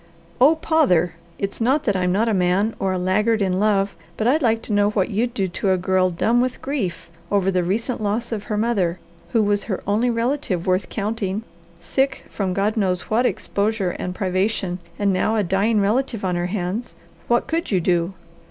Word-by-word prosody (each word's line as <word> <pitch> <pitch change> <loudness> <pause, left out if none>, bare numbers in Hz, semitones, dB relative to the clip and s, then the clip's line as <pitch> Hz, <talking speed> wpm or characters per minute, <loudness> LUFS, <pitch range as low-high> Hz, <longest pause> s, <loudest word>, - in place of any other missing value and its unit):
"Oh 285 +6 +6
pother! 270 - +2 0.2
It's 200 +3 -4
not 270 +6 +2
that 205 -7 +1
I'm 180 -1 +1
not 210 +5 +2
a 225 - +2
man, 190 +4 +2
or 195 -1 0
a 185 - 0
laggard 210 +5 +2
in 190 -2 +1
love; 200 -2 +2 0.2
but 220 - -1
I'd 285 +7 +3
like 225 -3 +2
to 215 - -3
know 205 0 +3
what 205 -3 0
you'd 235 +4 -1
do 195 -4 0
to 185 +2 -2
a 185 - +3
girl 185 0 +2
dumb 225 +7 +2
with 255 0 -1
grief 260 -11 -3 0.2
over 195 -1 +2
the 180 -1 +1
recent 220 +7 -1
loss 215 +4 -1
of 210 -2 -3
her 210 - -2
mother, 200 -6 +1 0.3
who 225 -3 +2
was 205 0 +1
her 195 -5 -3
only 215 +5 +2
relative 230 - -1
worth 185 0 +1
counting, 210 -1 -2 0.4
sick 265 +9 -1
from 195 -3 -2
God 205 +2 +1
knows 185 -3 -1
what 240 +3 +3
exposure 205 -2 -1
and 180 +1 -5
privation, 190 -1 -1 0.2
and 200 -1 +1
now 200 +4 +1
a 215 - +2
dying 200 +4 +2
relative 220 +1 0
on 180 -1 0
her 175 0 -1
hands. 195 +4 -3 0.3
What 240 0 +2
could 330 +1 -2
you 190 - +2
do?" 175 +1 +1
205 Hz, 200 wpm, -22 LUFS, 185-230 Hz, 0.4 s, Oh